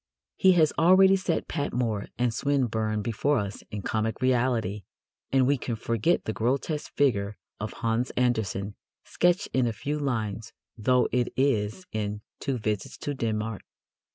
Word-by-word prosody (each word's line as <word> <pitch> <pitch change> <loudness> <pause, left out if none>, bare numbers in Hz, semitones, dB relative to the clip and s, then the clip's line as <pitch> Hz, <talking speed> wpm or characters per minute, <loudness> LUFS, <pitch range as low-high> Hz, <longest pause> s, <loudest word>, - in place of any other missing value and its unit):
He 190 -1 +5
has 160 -4 +4
already 190 +3 +7
set 190 -3 -1
Patmore 120 -8 -1
and 120 -1 +1
Swinburne 110 -6 0
before 120 +7 +1
us 100 -2 -3
in 105 -2 -5
comic 110 0 -1
reality, 120 -5 +1 0.5
and 135 -1 +4
who 140 +2 +3
can 120 0 -3
forget 115 +8 0
the 110 - -2
grotesque 140 +7 -1
figure 105 -7 +1 0.2
of 105 - -4
Hans 115 +3 -1
Andersen, 110 -5 0 0.3
sketched 175 +3 +1
in 130 -2 +3
a 115 - -1
few 145 +7 -3
lines 115 -6 -2 0.2
though 125 +3 +2
it 125 -1 +1
is, 130 - +1
in 105 -1 -3 0.2
Two 135 -3 -2
Visits 105 -3 -3
to 145 - -3
Denmark? 110 -4 -2
120 Hz, 150 wpm, -27 LUFS, 110-140 Hz, 0.5 s, already